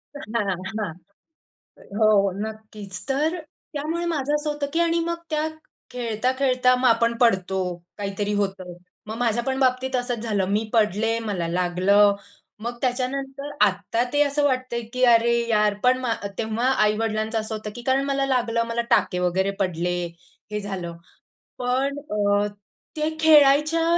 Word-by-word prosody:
हां, 215 -7 -2 0.2
हां. 205 -7 -3 1.0
हो, 210 -3 +4
नक्कीच. 215 -3 -8
तर 305 +6 +1 0.4
त्यामुळे 320 +4 -2
माझं 290 -1 -1
असं 300 0 -2
होतं 295 -1 -2
की 330 - +1
आणि 335 0 +2
मग 340 0 -2
त्या 310 0 0 0.4
खेळता-खेळता 250 +2 +1
मग 250 0 +2
आपण 230 0 +3
पडतो, 190 -4 +2 0.4
काहीतरी 205 +1 -2
होतं. 195 -3 -2 0.3
मग 220 - -5
माझ्यापण 240 +3 0
बाबतीत 260 0 +1
असंच 245 -1 -1
झालं, 205 -4 0
मी 210 +2 +1
पडले, 220 +1 +2
मला 200 -7 -2
लागलं. 185 +4 +3 0.5
मग 240 0 -4
त्याच्यानंतर 270 +2 -2 0.2
आत्ता 200 +4 0
ते 290 - +3
असं 290 +1 0
वाटतंय 255 -3 0
की 255 0 0
"अरे 235 +1 +4 0.2
यार," 210 -1 +3
पण 250 +1 +4
मा 240 -3 0 0.2
तेव्हा 225 +2 -1 0.2
आई-वडिलांचं 215 +1 0
असं 215 0 -4
होतं 215 0 -6
की 240 - -7
कारण 265 +1 +2
मला 275 -1 0
लागलं, 240 -3 +1
मला 235 0 -1
टाके 180 - +3
वगैरे 185 +2 +1
पडले, 180 -1 0 0.6
हे 210 - -2
झालं. 180 -4 -5 0.6
पण 260 +3 0
अ, 205 -6 +1 0.5
ते 305 +1 +1
खेळायच्या 305 +1 +5
230 Hz, 145 wpm, -24 LUFS, 205-270 Hz, 1.0 s, खेळायच्या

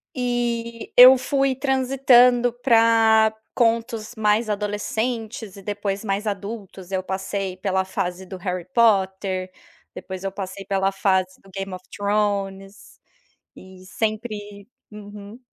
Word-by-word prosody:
E 240 -2 -2
eu 255 +1 +10
fui 270 +1 0
transitando 255 -2 +3
pra 225 -3 +4 0.2
contos 230 -1 0
mais 215 +1 +1
adolescentes 215 +1 -3
e 200 - -11
depois 205 0 -3
mais 205 +1 -2
adultos, 200 -2 -6
eu 190 -1 -1
passei 190 0 -4
pela 190 0 0
fase 190 -1 -4
do 190 0 -8
Harry 180 -1 -4
Potter, 190 -4 +1 0.4
depois 190 0 -7
eu 195 - -2
passei 195 0 -7
pela 195 0 0
fase 190 -1 0
do 195 - -19
Game 195 0 -5
of 185 0 -8
Thrones, 200 -1 -2 0.6
e 185 0 -14
sempre 210 -1 -4 0.2
uhum. 205 +1 -11
205 Hz, 120 wpm, -22 LUFS, 195-230 Hz, 0.6 s, eu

